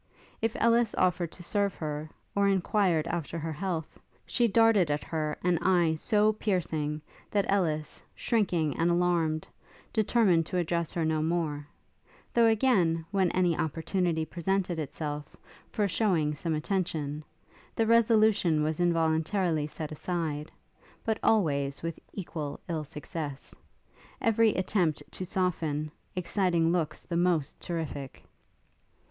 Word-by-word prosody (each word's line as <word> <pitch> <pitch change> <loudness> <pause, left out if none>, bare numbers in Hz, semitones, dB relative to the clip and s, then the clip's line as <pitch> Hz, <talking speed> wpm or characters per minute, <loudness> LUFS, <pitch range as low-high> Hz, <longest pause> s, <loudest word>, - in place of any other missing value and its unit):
If 225 0 0
Ellis 235 -1 +3
offered 180 -2 +1
to 175 - -10
serve 200 +1 0
her, 150 0 -4 0.3
or 200 0 +3
enquired 190 -4 +2
after 170 -1 -3
her 160 0 -3
health, 165 -1 -4 0.3
she 195 +8 +2
darted 225 -5 +4
at 145 0 -1
her 155 -2 -2
an 175 -2 +2
eye 175 -3 +3
so 210 +6 +2
piercing, 155 -8 -1 0.3
that 200 -2 +1
Ellis, 155 -6 0
shrinking 175 -10 +1
and 165 +1 +2
alarmed, 170 -3 +1 0.5
determined 205 -7 +3
to 185 - -2
address 170 -1 0
her 165 -2 0
no 155 -1 +1
more; 155 -3 -1 0.7
though 235 -1 +5
again, 200 -9 +3
when 190 -3 +2
any 180 -2 +2
opportunity 160 +1 -1
presented 175 0 -1
itself, 150 0 -5 0.3
for 210 -2 +1
shewing 170 -7 +1
some 160 +2 -2
attention, 155 -3 -2 0.5
the 225 - +2
resolution 220 -8 +4
was 155 +1 -1
involuntarily 165 -1 +1
set 155 0 -6
aside; 155 -2 -3 0.5
but 220 -1 0
always 140 -10 +1
with 165 0 -4
equal 155 -6 -5
ill 160 -3 -2
success, 150 -1 -6 0.7
every 225 -1 +3
attempt 180 -5 0
to 185 - -5
soften, 160 -5 -1 0.2
exciting 175 -2 +1
looks 160 -3 -1
the 170 - -3
most 170 -5 +1
terrific. 155 -5 -5
170 Hz, 130 wpm, -29 LUFS, 155-195 Hz, 0.7 s, though